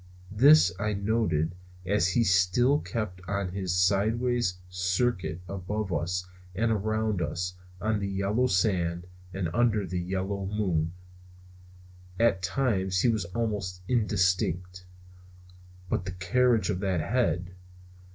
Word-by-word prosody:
This 135 - +6
I 105 +1 0
noted 100 -6 0 0.3
as 95 -1 +2
he 115 +5 +2
still 100 +9 +3
kept 105 -10 -4
on 100 -1 -1
in - - -10
his 95 -2 -2
sidewise 110 +3 +2
circuit 90 0 -1
above 100 +1 -3
us 90 +3 -1 0.3
and 115 +3 +1
around 110 -1 0
us 90 +2 -2 0.3
on 110 0 0
the 100 - -2
yellow 100 +6 +1
sand 90 -4 0 0.3
and 95 -2 -2
under 110 -3 +2
the 90 0 -3
yellow 95 +2 -3
moon. 90 -6 -1 1.3
At 115 -5 +3
times 95 -4 0
he 125 - +3
was 110 -5 0
almost 95 -2 -3
indistinct. 90 -5 0 1.0
But 90 - -1
the 90 - -4
carriage 115 +5 +2
of 90 - -2
that 95 -4 0
head! 90 -5 0
95 Hz, 125 wpm, -28 LUFS, 90-110 Hz, 1.3 s, This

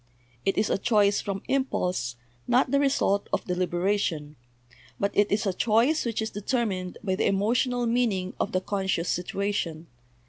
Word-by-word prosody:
It 195 - +1
is 210 - +1
a - - +1
choice 205 -2 +3
from 195 -1 -4
impulse, 180 - -1 0.3
not 250 +1 +3
the 280 - +4
result 265 -8 +1
of - - -1
deliberation; 180 -4 -1 0.6
but 200 0 +1
it 205 0 +3
is 210 +2 +1
a 195 - +1
choice 235 - +2
which 225 -1 -1
is 220 - -4
deter 235 +4 -1
mined 185 -3 -4
by 190 -3 0
the 185 - +1
emotional 240 +5 +1
meaning 225 -6 0
of - - -1
the 185 - 0
conscious 190 -3 -1
situa 200 +3 -2
tion. 165 -4 -3
200 Hz, 170 wpm, -27 LUFS, 185-230 Hz, 0.6 s, the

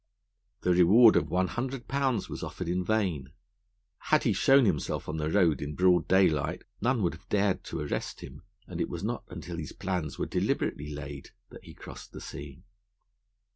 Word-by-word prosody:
The 90 - +2
reward 105 +7 +7
of 75 - +2
one 90 +3 +1
hundred 125 +1 -4
pounds 135 -6 0
was - - -7
offered 90 - -5
in 90 +2 0
vain. 90 -10 -1 0.7
Had 155 - +2
he 115 - +2
shown 135 +7 +5
himself 90 -8 -1
on 80 - -3
the 75 0 -1
road 85 -4 +3
in 75 +1 -4
broad 90 -2 +3
daylight, 90 -3 +2 0.2
none 120 0 +1
would 85 - +1
have 80 - -15
dared 100 -2 +1
to - - -4
arrest 75 - -4
him, 65 +2 -10 0.2
and 85 -1 -5
it - - -1
was 85 +1 -5
not 115 +3 -3
until 85 -1 -7
his 80 -3 -6
plans 90 -7 -3
were - - -1
deliberately 75 +1 -1
laid, 70 -1 -7 0.2
that - - -13
he - - -12
crossed - - -11
the - - -8
sea. 70 +3 -9
90 Hz, 185 wpm, -29 LUFS, 75-105 Hz, 0.7 s, reward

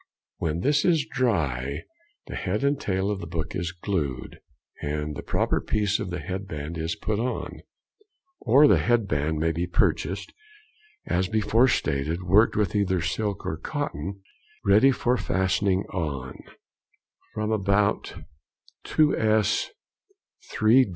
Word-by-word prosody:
When 80 +1 -2
this 145 +6 +2
is 165 -5 +3
dry, 75 - -1 0.4
the - - -8
head 100 +6 -2
and 140 0 +1
tail 95 +1 0
of 100 - -3
the 85 - -7
book 80 -1 -4
is 85 -2 -2
glued 85 - -3 0.4
and 75 0 -3
the - - -5
proper - - 0
piece 105 -1 0
of 95 - -4
the 90 - -3
head 95 +1 -5
band 75 -1 -5
is 80 +1 -2
put 105 -1 -2
on. 125 +2 -3 0.8
Or 145 +3 +6
the - - +5
head 120 -3 +2
band 75 -1 0
may 80 +2 +1
be 85 +2 -2
purchased, 95 +2 0 0.7
as 90 +1 0
before 110 +4 +3
stated, 80 - -1
worked 100 +6 +4
with 105 -3 0
either 95 -3 +1
silk 100 +5 -2
or - - -2
cotton 95 +7 -4 0.4
ready 105 +7 +6
for 125 -1 +1
fastening 95 -1 +1
on, 70 -8 -3 1.0
from 105 0 -1
about 100 0 +1 0.7
2_s._ 110 -8 +2 0.8
3_d. 115 +2 +4
95 Hz, 135 wpm, -26 LUFS, 80-110 Hz, 1.0 s, Or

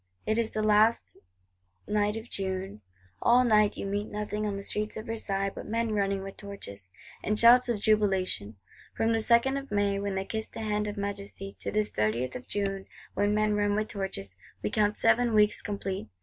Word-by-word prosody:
It 220 +1 +1
is 225 -1 +1
the 215 - -2
last 215 +2 +3 0.7
night 210 0 +1
of 225 +2 -7
June: 190 - -4 0.4
all 245 +2 +5
night 215 -3 +3
you - - -4
meet 205 +1 -2
nothing 210 0 -3
on 200 -1 -2
the 200 - -6
streets 210 +2 -3
of 215 - -6
Versailles 195 -4 -1
but - - -8
"men 230 0 -1
running 200 -1 0
with 195 0 -8
torches" 100 - -9 0.3
with 210 +1 0
shouts 240 +2 +7
of 230 -3 0
jubilation. 190 - +1 0.4
From 225 0 +2
the 225 - +2
2nd 235 +4 +3
of 275 - -11
May 205 -1 +1
when 200 -1 -2
they 190 0 -2
kissed 220 +1 -4
the - - -6
hand 210 -1 -1
of 205 0 -5
Majesty, 200 -1 -5
to - - -4
this 210 0 0
30th 110 +4 -1
of 250 - -7
June 195 -1 -2 0.3
when 205 +1 +1
men 215 0 +2
run 205 0 +1
with 215 +1 -1
torches, 145 - -5 0.3
we 105 - -1
count 210 0 +1
seven 230 0 +3
weeks 210 0 +4
complete. 195 - -4
210 Hz, 195 wpm, -28 LUFS, 195-220 Hz, 0.7 s, shouts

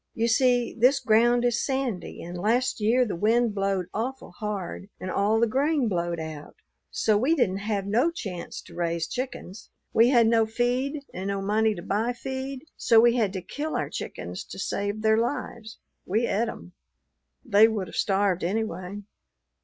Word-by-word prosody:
You 230 +1 +1
see 245 0 +2
this 255 +4 +4
ground 240 +2 +3
is 240 -1 +1
sandy, 265 -8 -3
and 175 +1 -7
last 230 +9 +1
year 240 +4 +3
the 215 - -3
wind 225 +4 +2
blowed 195 -2 0
awful 250 +2 -4
hard 200 -1 -5
and 185 - -4
all 210 +3 +2
the 235 - +4
grain 275 +3 +1
blowed 175 -3 -1
out, 155 -2 -7 0.3
so 215 - +1
we 285 +8 +2
didn't 195 - +1
have 205 -1 -2
no 235 +10 +2
chance 190 - -6
to - - -15
raise 170 -1 -1
chickens. 245 -6 -6 0.2
We 230 +2 +5
had 240 -3 +5
no 225 -1 +3
feed 255 +5 -1
and 190 +2 -4
no 200 0 -1
money 215 +2 +1
to 175 - -8
buy 220 +5 0
feed, 265 +2 -5
so 230 - +4
we 235 +1 +5
had 220 -6 +1
to 190 -3 -5
kill 305 +2 -4
our - - -2
chickens - - -6
to - - -10
save 205 +2 -3
their 220 0 +4
lives. 230 -3 -4 0.3
We 220 +5 +1
et 230 +1 0
'em. 180 - -9 0.7
They 220 -1 +6
would 215 -4 -2
have - - -10
starved 195 -3 +1
anyway." 200 0 -3
220 Hz, 175 wpm, -26 LUFS, 195-245 Hz, 0.7 s, They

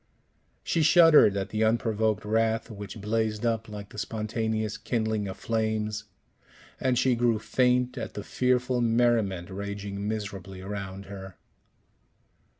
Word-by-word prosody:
She 165 - +1
shuddered 160 - +7
at 95 0 -2
the 110 0 0
unprovoked 110 -2 +1
wrath 115 +1 +1
which 105 +1 -8
blazed 110 +1 -1
up 115 -1 -1
like 105 -1 -8
the 105 - -8
spontaneous 110 -1 -2
kindling 110 -3 -1
of 95 - -6
flames 110 -1 -1 0.7
and 130 -1 +1
she 130 +1 +3
grew 120 -1 +2
faint 125 +2 +1
at - - -6
the 105 - -5
fearful 125 +1 +1
merriment 115 -6 +1
raging 100 +1 -5
miserably 100 -3 -5
around 100 0 -6
her. 95 -2 -9
110 Hz, 130 wpm, -27 LUFS, 100-115 Hz, 0.7 s, shuddered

